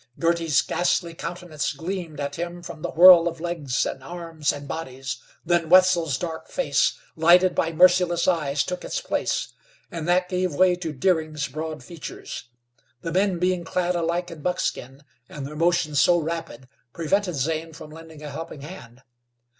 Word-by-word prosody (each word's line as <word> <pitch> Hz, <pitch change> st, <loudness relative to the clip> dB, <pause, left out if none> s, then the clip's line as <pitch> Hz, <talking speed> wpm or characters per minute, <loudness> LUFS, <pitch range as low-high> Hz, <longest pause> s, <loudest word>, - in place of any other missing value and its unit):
Girty's 165 Hz, -3 st, +2 dB
ghastly 175 Hz, -1 st, 0 dB
countenance 160 Hz, -5 st, -4 dB
gleamed 165 Hz, 0 st, -5 dB
at 140 Hz, 0 st, -3 dB
him 175 Hz, +1 st, -5 dB
from 170 Hz, -3 st, -9 dB
the -, -, -3 dB
whirl 175 Hz, 0 st, +8 dB
of 165 Hz, -1 st, -4 dB
legs, 160 Hz, -6 st, -1 dB
and 135 Hz, -, -5 dB
arms 165 Hz, -2 st, -3 dB
and 145 Hz, 0 st, -8 dB
bodies. 135 Hz, -4 st, -5 dB, 0.3 s
Then 170 Hz, -1 st, +1 dB
Wetzel's 175 Hz, -6 st, +5 dB
dark 160 Hz, 0 st, -5 dB
face, -, -, +1 dB, 0.2 s
lighted 180 Hz, +2 st, +5 dB
by 165 Hz, -, 0 dB
merciless 175 Hz, 0 st, +4 dB
eyes, 150 Hz, -6 st, +1 dB
took 180 Hz, 0 st, -5 dB
its -, -, -3 dB
place, -, -, -2 dB, 0.4 s
and 165 Hz, -2 st, -5 dB
that 180 Hz, +1 st, +3 dB
gave 180 Hz, -3 st, -1 dB
way 185 Hz, +3 st, +5 dB
to 175 Hz, -3 st, -5 dB
Deering's 155 Hz, -1 st, 0 dB
broad 155 Hz, +3 st, -6 dB
features. 170 Hz, -6 st, -8 dB, 0.6 s
The 165 Hz, -, -4 dB
men 190 Hz, +1 st, +1 dB
being 180 Hz, 0 st, 0 dB
clad 180 Hz, +1 st, -1 dB
alike 170 Hz, +1 st, -1 dB
in 160 Hz, -3 st, -10 dB
buckskin, 140 Hz, -5 st, -3 dB, 0.3 s
and 140 Hz, -2 st, -7 dB
their 150 Hz, +2 st, -8 dB
motions 165 Hz, -2 st, +2 dB
so 175 Hz, -, +5 dB
rapid, 160 Hz, -6 st, -5 dB, 0.3 s
prevented 180 Hz, +2 st, 0 dB
Zane 160 Hz, +4 st, -2 dB
from 155 Hz, -1 st, -11 dB
lending 160 Hz, -1 st, -12 dB
a 150 Hz, -, -6 dB
helping 155 Hz, 0 st, -7 dB
hand. 135 Hz, -6 st, -11 dB
165 Hz, 160 wpm, -24 LUFS, 150-175 Hz, 0.6 s, whirl